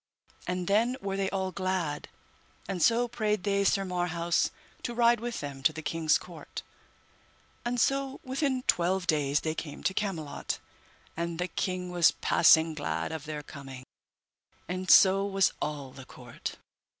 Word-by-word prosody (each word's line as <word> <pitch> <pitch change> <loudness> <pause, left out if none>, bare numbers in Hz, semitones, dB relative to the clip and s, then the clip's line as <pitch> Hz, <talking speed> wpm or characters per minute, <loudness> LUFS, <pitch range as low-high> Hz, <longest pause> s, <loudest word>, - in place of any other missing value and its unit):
And 180 0 -2
then 230 +6 +2
were 195 -5 -3
they 195 -1 0
all 190 -1 -2
glad, 185 -6 -2 0.6
and 185 -2 -3
so 235 +6 +4
prayed 215 -4 -1
they 200 0 +1
Sir 195 0 +2
Marhaus 175 -1 0 0.3
to 240 - -4
ride 235 0 +4
with 240 +1 -4
them 140 -2 -6
to 135 - +4
the 160 0 -8
king's 160 -1 +2
court. 175 -3 -9 1.0
And 245 0 -1
so 275 +2 +1
within 260 -1 -1
twelve 180 -1 +2
days 145 -3 +2
they 155 - -1
came 150 -2 -7
to 190 - +1
Camelot, 170 -9 -3 0.6
and 170 0 -3
the 180 +1 -1
king 180 0 -2
was 175 -2 +4
passing 160 -1 +5
glad 150 +1 -3
of 160 -2 -5
their 150 -1 -5
coming, 135 -3 -10 0.8
and 185 +1 -4
so 195 0 +7
was 195 -2 +2
all 145 -3 -3
the 130 0 -11
court. 120 -3 -8
180 Hz, 155 wpm, -29 LUFS, 155-200 Hz, 1.0 s, so